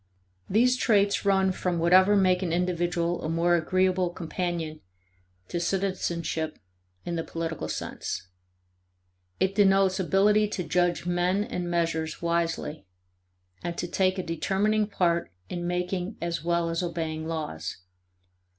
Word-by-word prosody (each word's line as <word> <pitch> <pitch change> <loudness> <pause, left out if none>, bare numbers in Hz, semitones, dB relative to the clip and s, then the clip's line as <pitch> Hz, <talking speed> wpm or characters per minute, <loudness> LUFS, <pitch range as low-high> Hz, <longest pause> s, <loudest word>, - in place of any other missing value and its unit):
These 250 +5 +4
traits 205 -5 +2
run 190 -1 +3
from 180 -1 -1
whatever 185 +4 +5
make 185 -2 +3
an 180 -3 -1
individual 175 0 0
a 155 - -2
more 170 +1 +3
agreeable 185 +1 +2
companion 170 -2 -4 0.7
to 175 - -2
citizenship 170 -4 -1 0.5
in 170 -1 -2
the 165 - -1
political 165 -1 -4
sense: 90 - -4 1.1
it 190 +1 +2
denotes 195 -1 +4
ability 210 +3 +3
to 195 -3 -3
judge 175 +2 +1
men 180 +3 +1
and 180 -6 -4
measures 165 -2 -1
wisely 165 - -2 0.7
and 170 -1 -4
to 175 - -2
take 185 +1 +1
a 185 - -2
determining 200 +6 +1
part 170 - 0 0.2
in 175 -1 -3
making 180 +3 -2
as 170 -1 -3
well 170 0 +1
as 165 - -1
obeying 160 -2 -3
laws. 150 - -4
175 Hz, 130 wpm, -27 LUFS, 170-190 Hz, 1.1 s, whatever